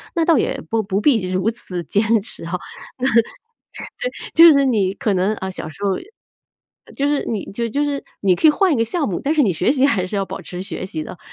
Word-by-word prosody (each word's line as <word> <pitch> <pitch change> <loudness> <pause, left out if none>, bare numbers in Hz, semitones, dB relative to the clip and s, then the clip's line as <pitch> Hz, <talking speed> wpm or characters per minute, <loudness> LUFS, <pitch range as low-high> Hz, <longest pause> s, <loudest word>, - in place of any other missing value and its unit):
那 335 -1 +2
倒 330 -3 +4
也 - - -1
不 225 -1 0
不 195 0 -1
必 220 -6 +2
如 185 +3 +1
此 185 -6 -5
坚 205 +5 0 0.2
持 215 - -2
啊。 165 - -6
那 180 - -6 1.6
对， 335 +1 +9
就 - - +10
是 280 0 +4
你 205 -7 +1
可 215 0 -1
能， 190 +3 +1
啊， 190 -2 -5
小 185 - -7
时 155 - -13
候 195 -2 +1 1.0
就 280 - 0
是 290 -1 0
你 215 -4 -3
就 235 +3 -2
就 285 +6 0
是 285 -1 -2 0.2
你 190 -2 +3
可 310 - +4
以 - - +8
换 370 +3 +2
一 - - +2
个 230 - +2
项 300 +6 -1
目， 180 - -3
但 295 +3 0
是 305 - +4
你 205 -8 +2
学 180 +7 +1
习 270 -1 +2
还 195 -9 +1
是 205 - -4
要 195 - 0
保 - - -7
持 180 0 -7
学 185 -1 -5
习 160 -4 -5
的。 175 - -9
215 Hz, 260 characters per minute, -20 LUFS, 185-280 Hz, 1.6 s, 就